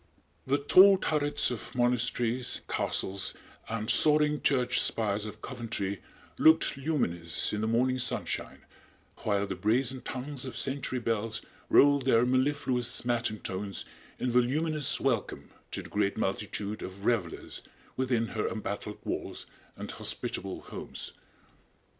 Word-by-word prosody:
The 140 +2 +3
tall 190 +7 +7
turrets 145 -6 +1
of 120 0 -6
monasteries, 120 0 +1
castles 95 0 -2 0.3
and 110 -1 -3
soaring 150 +3 +4
church 125 -3 +3
spires 105 -2 +1
of 105 0 -9
Coventry 110 - -3 0.4
looked 160 -1 +5
luminous 95 - -1
in 105 - -1
the 110 - 0
morning 130 +3 +2
sunshine, 125 - -2 0.5
while 100 -1 0
the - - -3
brazen 125 +4 0
tongues 135 +1 -5
of 130 - -6
century 135 -1 -2
bells 115 -2 -1 0.3
rolled 140 -2 +6
their 120 -2 +5
mellifluous 130 -2 +1
matin 120 -3 -1
tones 100 +1 -4 0.3
in 125 - -1
voluminous 145 +4 +2
welcome 125 -6 -1 0.2
to - - -5
the - - -11
great 100 -1 0
multitude 105 +1 -2
of 95 +2 -8
revelers 105 -9 -1 0.3
within 125 -3 0
her 110 - -1
embattled 105 -1 -4
walls - - -4 0.3
and - - -5
hospitable - - -3
homes. - - -6
120 Hz, 125 wpm, -30 LUFS, 105-135 Hz, 0.5 s, tall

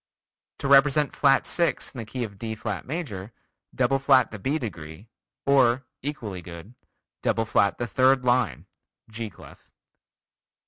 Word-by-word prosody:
To 140 - -3
represent 140 +1 +4
flat 135 -1 +4
6 170 -6 -1
in 130 - -8
the 115 - -5
key 125 +3 -4
of 100 -4 -8
D 110 -1 -4
flat 105 -2 -5
major, 125 - -5 0.4
double 130 +2 +2
flat 135 -1 +4
the 105 - -7
B 135 +9 0
degree, 95 - -8 0.4
or 130 -2 +3 0.2
(equally 120 -10 -5
good) 85 +6 -11 0.5
double 115 - 0
flat 100 -2 +2
the 120 - -2
third 130 +4 +3
line 120 -6 +1 0.5
(G 110 0 -5
clef). - - -16
120 Hz, 145 wpm, -25 LUFS, 105-135 Hz, 0.5 s, represent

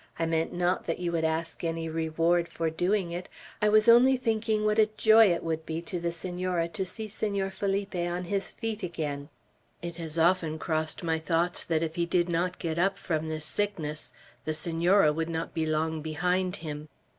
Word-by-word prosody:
I 165 - 0
meant 165 0 0
not 175 +1 0
that - - -1
you 175 -1 -2
would 165 -1 0
ask 160 +1 -2
any 165 0 -2
reward 165 +2 +1
for 165 -1 -2
doing 180 +2 0
it; 175 +1 -5 0.3
I 210 - +4
was 215 +1 +5
only 250 +3 +7
thinking 220 -3 0
what 215 0 +2
joy 220 -2 +7
it 170 - -1
would 160 -1 -2
be 160 0 -3
to 175 +1 -4
the 170 0 -1
Senora 175 0 -2
to 190 +3 -2
see 220 +3 -5
Senor 200 -2 -2
Felipe 200 0 -2
on 175 0 -2
his 195 +2 -1
feet 225 -1 -4
again. 150 -5 -4 0.5
It 170 -1 -6
has 165 -1 -4
often 165 -2 +2
crossed 155 +3 -2
my 160 -1 0
thoughts 170 +2 0
that 160 -1 +1
if 160 0 -4
he 170 0 +1
did 175 0 +1
not 175 +2 0
get 165 0 -2
up 195 +2 +2
from 160 -2 -2
this 155 -1 -4
sickness 165 -8 -3 0.3
the 155 - -2
Senora 165 +1 +3
would 165 +1 -2
not 165 0 -3
be 160 -1 -1
long 155 0 0
behind 180 +4 0
him. 150 -3 -7
170 Hz, 195 wpm, -28 LUFS, 160-190 Hz, 0.5 s, only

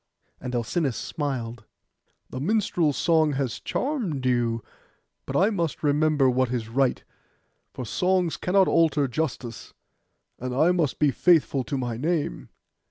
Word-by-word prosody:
And 125 -1 -5
Alcinous 130 +3 -1
smiled. 125 -7 -4 0.7
'The 130 - -5
minstrel's 175 -3 +1
song 160 -3 +3
has 135 -4 -2
charmed 215 - -2
you: 120 -3 +1 0.6
but - - -4
I 200 +4 +4
must 170 -7 -2
remember 150 -1 +3
what 130 0 +2
is 115 -3 -3
right, 130 +2 +1 0.7
for 125 - -6
songs 180 - +1
cannot 190 +1 +2
alter 155 -4 +3
justice; 125 -4 -4 0.6
and 125 0 -4
I 160 +6 +4
must 165 -7 0
be 150 -2 +3
faithful 155 -5 +3
to 140 - -3
my 120 -3 -3
name. 155 +3 -2
145 Hz, 135 wpm, -25 LUFS, 125-165 Hz, 0.7 s, I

